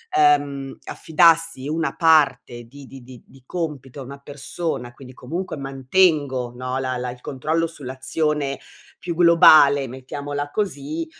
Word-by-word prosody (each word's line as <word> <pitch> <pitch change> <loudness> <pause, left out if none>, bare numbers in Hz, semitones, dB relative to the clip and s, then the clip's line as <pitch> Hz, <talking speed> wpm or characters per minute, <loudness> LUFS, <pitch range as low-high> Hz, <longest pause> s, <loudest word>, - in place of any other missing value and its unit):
ehm, 145 -2 +1
affidassi 165 -3 +2
una 160 +1 -2
parte 155 -7 +2
di 140 +4 -14
di 130 -1 -13
di 125 -1 -14
di 135 -2 -20
compito 145 -6 -6
a - - -6
una 140 +2 -10
persona, 140 -2 -6
quindi 130 0 -13
comunque 165 +8 -6
mantengo, 135 -2 0
no, 130 +1 -4
la 130 -1 -2
la 125 0 -4
il 125 0 -9
controllo 155 +6 -2
sull'azione 140 0 -3 0.4
più 170 -1 -5
globale, 155 -5 +6
mettiamola 145 +3 -6
così, 160 -5 -3
140 Hz, 135 wpm, -21 LUFS, 130-160 Hz, 0.4 s, globale